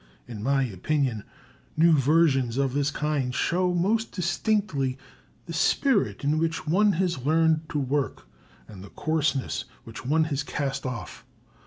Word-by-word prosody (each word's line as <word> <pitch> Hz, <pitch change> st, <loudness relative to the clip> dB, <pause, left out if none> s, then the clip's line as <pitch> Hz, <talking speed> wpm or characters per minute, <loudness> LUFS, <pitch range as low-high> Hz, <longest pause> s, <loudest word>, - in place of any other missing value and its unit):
In 115 Hz, -4 st, -7 dB
my 135 Hz, +3 st, +2 dB
opinion, 125 Hz, -, -1 dB, 0.5 s
new 165 Hz, +1 st, +5 dB
versions 135 Hz, -4 st, +3 dB
of 135 Hz, -2 st, 0 dB
this 145 Hz, 0 st, +1 dB
kind 145 Hz, -4 st, -2 dB
show 180 Hz, +1 st, +1 dB
most 205 Hz, +6 st, 0 dB
distinctly 175 Hz, -, -1 dB, 0.5 s
the 170 Hz, -, -7 dB
spirit 200 Hz, -, +1 dB
in 150 Hz, +2 st, +1 dB
which 165 Hz, 0 st, -1 dB
one 200 Hz, +6 st, +3 dB
has 170 Hz, -7 st, -1 dB
learned 160 Hz, +1 st, +2 dB
to -, -, -3 dB
work 135 Hz, -, -2 dB, 0.4 s
and 95 Hz, -3 st, -11 dB
the 100 Hz, -, -11 dB
coarsenesses 150 Hz, -5 st, -1 dB, 0.2 s
which 115 Hz, -, -10 dB
one 155 Hz, +5 st, +2 dB
has 140 Hz, -, 0 dB
cast 140 Hz, -2 st, -3 dB
off. 120 Hz, -4 st, -7 dB
150 Hz, 145 wpm, -26 LUFS, 130-165 Hz, 0.5 s, new